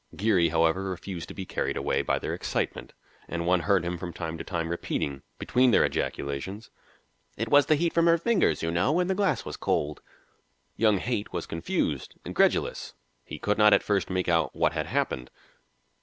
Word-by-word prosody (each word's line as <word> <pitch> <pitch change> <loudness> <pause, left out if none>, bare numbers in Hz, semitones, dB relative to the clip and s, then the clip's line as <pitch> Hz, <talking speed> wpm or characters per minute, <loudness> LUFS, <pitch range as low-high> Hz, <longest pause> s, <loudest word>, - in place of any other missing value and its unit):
Geary, 95 -5 +3
however, 85 +4 +2
refused 95 -1 -5
to - - -10
be 95 - -5
carried - - -2
away - - 0
by - - 0
their - - -3
excitement, - - -3 0.3
and 85 0 -3
one 90 +1 +3
heard 95 -1 +2
him 85 0 -3
from 90 0 -5
time 85 -2 -5
to 80 - -6
time 85 -3 -3
repeating, 70 -5 -3 0.2
between 125 +1 +3
their 115 - +5
ejaculations, 80 +10 -4 0.7
"It 115 +1 -2
was 145 +1 +5
the 155 - +5
heat 170 +2 0
from 170 0 +3
her 170 0 +5
fingers, 205 - +1
you 80 - 0
know, 125 - +2
and 180 - +1
the - - +3
glass 195 0 0
was - - -6
cold." 75 0 -1 0.7
Young 110 -2 +3
Haight 110 0 -2
was 85 -2 -3
confused, 80 0 -2
incredulous; - - 0 0.3
he - - -8
could 105 +1 -1
not 105 -1 +7
at 100 - +4
first 100 -2 0
make 95 -1 -1
out 85 -1 +1
what - - +2
had - - -2
happened. 65 -1 -1
95 Hz, 190 wpm, -27 LUFS, 85-115 Hz, 0.7 s, not